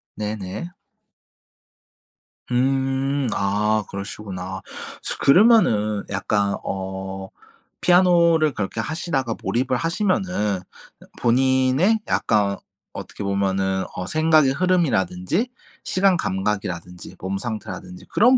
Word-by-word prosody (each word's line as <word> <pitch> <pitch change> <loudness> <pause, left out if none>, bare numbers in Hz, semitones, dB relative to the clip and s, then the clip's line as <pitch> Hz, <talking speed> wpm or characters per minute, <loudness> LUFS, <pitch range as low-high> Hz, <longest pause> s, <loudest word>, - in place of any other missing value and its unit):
네네. 105 - -4 1.8
음 135 +1 +1
아 105 +2 +1
그러시구나. 95 -2 -6 0.4
저 - - -3
그러면은 140 - +4
약간 100 0 0
어 95 0 -5 0.5
피아노를 170 -4 +4
그렇게 105 +2 -3
하시다가 145 -6 -2
몰입을 130 +1 0
하시면은 170 - 0 0.6
본인의 130 - +3
약간 100 -2 +1 0.4
어떻게 - - -7
보면은 95 -1 0
어 90 0 -4
생각의 155 -3 +4
흐름이라든지 165 - +1 0.3
시간 185 -1 +2
감각이라든지 95 - -3
몸 95 +1 -3
상태라든지 95 -5 -6
그런 250 +4 +5
110 Hz, 235 characters per minute, -22 LUFS, 95-160 Hz, 1.8 s, 그런